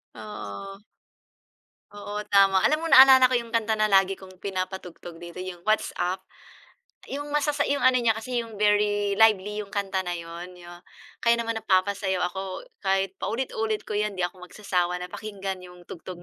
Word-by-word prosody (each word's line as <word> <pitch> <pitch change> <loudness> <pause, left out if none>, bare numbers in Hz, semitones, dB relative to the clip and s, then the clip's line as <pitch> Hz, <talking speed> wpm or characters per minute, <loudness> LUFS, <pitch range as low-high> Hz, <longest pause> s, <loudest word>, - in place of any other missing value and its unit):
Oo. 110 - -8 1.1
Oo, 205 0 -6
tama 195 -1 +5
alam 305 - +3
mo 330 - -4
naalala 265 -3 +8
ko 255 - -1
'yong 235 -2 -1
kanta 225 -1 +1
na 215 0 +1
lagi 195 0 +4
kong 185 -1 -15
pinapatugtog 185 -3 -6
dito 175 +1 -8
'yong 180 -1 -9
What's 215 0 +2
Up 180 +2 -1 0.9
'yong 290 +1 -4
masasa 295 -1 +1
'yong 285 -1 0
ano 255 0 +5
niya 235 -2 +2
kasi 240 +3 -3
'yong 230 -2 -5
very 205 -1 +1
lively 210 -2 +4
'yong 200 -2 -7
kanta 195 -1 -1
na 175 - -2
'yon 170 +1 -8
yo 175 -1 -13 0.5
kaya 235 0 +3
naman 230 -1 -2
napapasayaw 190 -2 0
ako 190 0 -6 0.2
kahit 195 0 0
paulit-ulit 225 -2 -2
ko 210 - -3
'yan 210 -1 -1
'di 185 - -3
ako 180 +1 -4
magsasawa 180 -3 -2
na 180 - -7
pakinggan 200 -2 -5
'yong 180 -1 -13
tugtog 175 +1 -9
200 Hz, 170 wpm, -26 LUFS, 185-220 Hz, 1.1 s, naalala